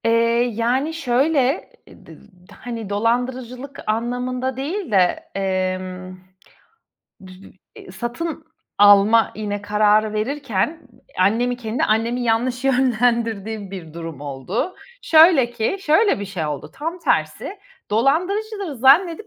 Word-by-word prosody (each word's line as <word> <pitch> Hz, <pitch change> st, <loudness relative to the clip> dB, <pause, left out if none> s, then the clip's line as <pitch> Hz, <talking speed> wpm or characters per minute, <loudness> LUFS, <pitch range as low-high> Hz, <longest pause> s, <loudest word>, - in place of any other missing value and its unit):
Eee, 230 Hz, -, +3 dB, 0.4 s
yani 250 Hz, +8 st, 0 dB
şöyle, 275 Hz, -1 st, +1 dB, 0.2 s
d -, -, -17 dB, 0.4 s
d -, -, -14 dB
hani, 230 Hz, -4 st, -7 dB
dolandırıcılık 245 Hz, +5 st, -2 dB
anlamında 250 Hz, +3 st, -2 dB
değil 330 Hz, -, -4 dB
de, 185 Hz, -3 st, +1 dB
emm, 185 Hz, -1 st, -3 dB, 1.1 s
dü 185 Hz, -, -12 dB, 0.4 s
iii, -, -, -12 dB
satın 245 Hz, -, -5 dB, 0.3 s
alma, 205 Hz, +2 st, +6 dB
yine 205 Hz, -1 st, -4 dB
kararı 210 Hz, +1 st, +2 dB
verirken 270 Hz, -, -2 dB, 0.4 s
annemi, 230 Hz, +6 st, +2 dB
kendi 235 Hz, 0 st, -2 dB
annemi, 230 Hz, +3 st, 0 dB
yanlış 245 Hz, +2 st, 0 dB
yönlendirdiğim 230 Hz, -5 st, 0 dB
bir 170 Hz, -5 st, -9 dB
durum 165 Hz, -4 st, -7 dB
oldu. 145 Hz, -, -4 dB, 0.3 s
Şöyle 315 Hz, -6 st, +6 dB
ki 240 Hz, -, -1 dB
şöyle 390 Hz, -, +3 dB
bir -, -, -3 dB
şey 185 Hz, -5 st, -4 dB
oldu: 145 Hz, -2 st, -5 dB
Tam 325 Hz, +5 st, -4 dB
tersi, 385 Hz, +3 st, -1 dB, 0.3 s
dolandırıcılığı 360 Hz, -, 0 dB
zannedip 325 Hz, -, +4 dB
235 Hz, 110 wpm, -21 LUFS, 205-275 Hz, 1.1 s, alma